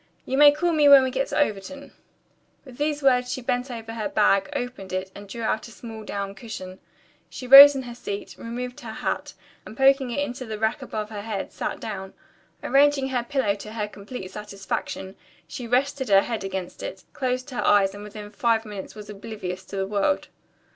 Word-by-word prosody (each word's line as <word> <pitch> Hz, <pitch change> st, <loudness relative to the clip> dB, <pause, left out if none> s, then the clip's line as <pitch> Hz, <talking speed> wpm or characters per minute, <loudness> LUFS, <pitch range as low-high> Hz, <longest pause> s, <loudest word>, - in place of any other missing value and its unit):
You 265 Hz, -, -2 dB
may 290 Hz, +1 st, +8 dB
call 345 Hz, +4 st, 0 dB
me 300 Hz, -2 st, +5 dB
when 275 Hz, -1 st, +9 dB
we 260 Hz, -, -1 dB
get 270 Hz, +2 st, -1 dB
to -, -, -3 dB
Overton." 280 Hz, +2 st, -2 dB, 0.7 s
With 255 Hz, -3 st, -13 dB
these 295 Hz, 0 st, -1 dB
words 250 Hz, -2 st, +3 dB
she -, -, -3 dB
bent 245 Hz, +1 st, -2 dB
over 225 Hz, -2 st, -7 dB
her 225 Hz, +4 st, -3 dB
bag, 200 Hz, -7 st, +3 dB
opened 245 Hz, -6 st, -5 dB
it, 185 Hz, 0 st, -3 dB
and 200 Hz, 0 st, -11 dB
drew 230 Hz, +3 st, -6 dB
out 220 Hz, +1 st, -1 dB
a -, -, -13 dB
small 225 Hz, -1 st, -9 dB
down 200 Hz, -1 st, -4 dB
cushion. 190 Hz, -4 st, -8 dB, 0.5 s
She 255 Hz, -, -8 dB
rose 275 Hz, +2 st, +11 dB
in 265 Hz, -, -3 dB
her 240 Hz, -1 st, -8 dB
seat, 205 Hz, -4 st, -6 dB
removed 245 Hz, +2 st, -6 dB
her 225 Hz, -2 st, -8 dB
hat, -, -, -3 dB, 0.3 s
and, 220 Hz, -, -11 dB
poking 270 Hz, -1 st, +4 dB
it 240 Hz, -, -4 dB
into 255 Hz, -2 st, -7 dB
the 215 Hz, -1 st, -4 dB
rack 220 Hz, +6 st, 0 dB
above 215 Hz, -4 st, -5 dB
her 205 Hz, -1 st, -5 dB
head, 205 Hz, -2 st, -4 dB
sat -, -, -4 dB
down. 190 Hz, -3 st, -6 dB, 0.5 s
Arranging 275 Hz, -1 st, +3 dB
her 250 Hz, -2 st, 0 dB
pillow 240 Hz, -4 st, 0 dB
to 215 Hz, +2 st, -9 dB
her 210 Hz, -2 st, -2 dB
complete 200 Hz, -1 st, -9 dB
satisfaction, 195 Hz, -2 st, -5 dB, 0.3 s
she 245 Hz, -, -7 dB
rested 265 Hz, +1 st, 0 dB
her 195 Hz, -1 st, +7 dB
head 225 Hz, -1 st, -4 dB
against 190 Hz, -2 st, -5 dB
it, 190 Hz, -, -7 dB
closed 255 Hz, 0 st, -2 dB
her 250 Hz, -, -2 dB
eyes 195 Hz, -2 st, +4 dB
and 205 Hz, 0 st, -9 dB
within 210 Hz, 0 st, -9 dB
five 225 Hz, +1 st, +1 dB
minutes 205 Hz, -2 st, -8 dB
was 210 Hz, -1 st, -9 dB
oblivious 200 Hz, -3 st, -6 dB
to -, -, -9 dB
the 195 Hz, 0 st, -1 dB
world. 205 Hz, +8 st, 0 dB
225 Hz, 200 wpm, -24 LUFS, 205-260 Hz, 0.7 s, rose